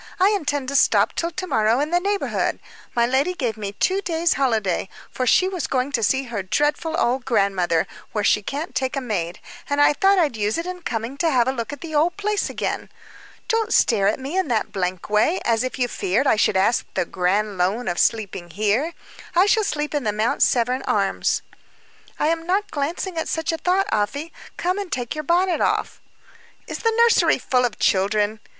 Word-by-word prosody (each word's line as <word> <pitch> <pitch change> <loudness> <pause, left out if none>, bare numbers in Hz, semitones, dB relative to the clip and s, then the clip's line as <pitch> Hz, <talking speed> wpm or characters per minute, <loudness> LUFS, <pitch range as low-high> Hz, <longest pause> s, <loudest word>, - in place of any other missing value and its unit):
"I 380 +2 +5
intend 290 -9 -1
to 280 - -4
stop - - +4
till 335 - -1
to 345 +2 -5
morrow 220 -6 +2
in 300 +3 -1
the 350 - +3
neighborhood. 400 +2 -1 0.4
My 235 -1 +3
lady 270 +9 +1
gave 240 - -2
me 205 -2 -5
two 380 - 0
days' 335 -2 +1
holiday 220 -9 0 0.2
for 255 - -2
she 370 - +4
was 365 -6 -3
going 260 +1 -1
to 240 - 0
see 265 +5 +2
her 235 -6 -4
dreadful 295 - 0
old 250 +2 +1
grandmother, 195 -8 +1 0.3
where 210 - -1
she 210 - +3
can't 285 - -5
take 260 +1 -1
a - - 0
maid 195 -8 -3 0.3
and 285 0 0
I 290 - +5
thought 390 +5 +3
I'd 310 -9 +2
use 210 0 -1
it 335 - -3
in 365 0 -6
coming 235 -2 -4
to 325 +3 +1
have 250 -5 +2
a - - +2
look 230 -4 -4
at 290 - -8
the 330 -2 -7
old 325 +5 +2
place 415 0 -1
again. - - -3 0.6
Don't 450 0 0
stare 205 - +3
at 210 - +1
me 275 +6 -5
in 380 -4 +1
that 230 -4 -1
blank 185 -2 -3
way, 215 - +2
as 230 0 +2
if 255 - -4
you 250 -2 +1
feared 230 +3 0
I 265 - +4
should 205 -2 +2
ask 205 +5 +2
the - - +1
grand 195 +3 -1
loan 200 +7 0
of 175 - -1
sleeping 195 -5 0
here. 215 - 0 0.4
I 360 +3 +6
shall 435 +1 +3
sleep 300 -5 -2
at 290 -2 -1
the 215 - 0
Mount 215 +3 -1
Severn 250 +2 +2
Arms." 195 -2 0 0.7
"I 310 +2 +2
was 330 0 -5
not 385 +4 -1
glancing 325 +4 -3
at 320 - -3
such 320 0 -1
a 325 - -2
thought, 370 +4 +2
Afy. 280 +10 -2 0.2
Come 365 +3 -1
and 395 -3 -6
take 245 -2 -2
your 305 -1 -4
bonnet 355 +3 +1
off." - - -1 0.6
"Is - - -6
the 455 - +1
nursery 470 0 +4
full 250 -1 +1
of 230 -3 -3
children?" 205 +2 +1
260 Hz, 210 wpm, -22 LUFS, 215-335 Hz, 0.7 s, I